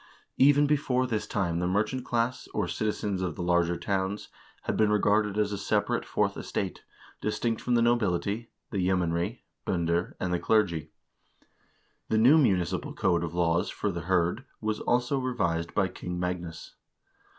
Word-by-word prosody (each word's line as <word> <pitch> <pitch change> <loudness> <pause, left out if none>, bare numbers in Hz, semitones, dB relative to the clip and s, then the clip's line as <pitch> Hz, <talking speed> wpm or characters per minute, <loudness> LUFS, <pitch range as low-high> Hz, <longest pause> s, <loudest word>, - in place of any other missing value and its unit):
Even 145 +2 +6
before 140 -3 +1
this 110 -4 -2
time 85 -4 -1
the 90 - 0
merchant 110 +7 0
class, 120 +1 -1
or - - 0
citizens 105 -3 -2
of 90 -4 -2
the 90 - -4
larger 85 0 +2
towns, 100 +1 -2 0.3
had - - -1
been 110 -1 +3
regarded 105 0 +2
as 105 -1 +1
a 100 - -3
separate - - 0
fourth - - 0
estate, - - -4 0.4
distinct 115 +2 -1
from 125 - +1
the 115 - +4
nobility, 110 -1 +1 0.2
the 100 - -1
yeomanry 90 -2 0 0.2
(binder), 85 0 -1
and 90 -1 -1
the 90 - +1
clergy.1 90 -6 +1 1.2
The 110 - +2
new 130 +8 +7
munici 95 - +2
pal - - -7
code 85 -2 +1
of 85 0 -4
laws 85 0 +2
for 105 - -2
the 85 -1 -4
hird' 90 +6 +1 0.2
was 110 -1 -2
also 125 +3 +1
revised 85 -10 -1
by 95 - +3
King 90 -1 -6
Magnus. 90 -2 -4
100 Hz, 160 wpm, -28 LUFS, 85-115 Hz, 1.2 s, new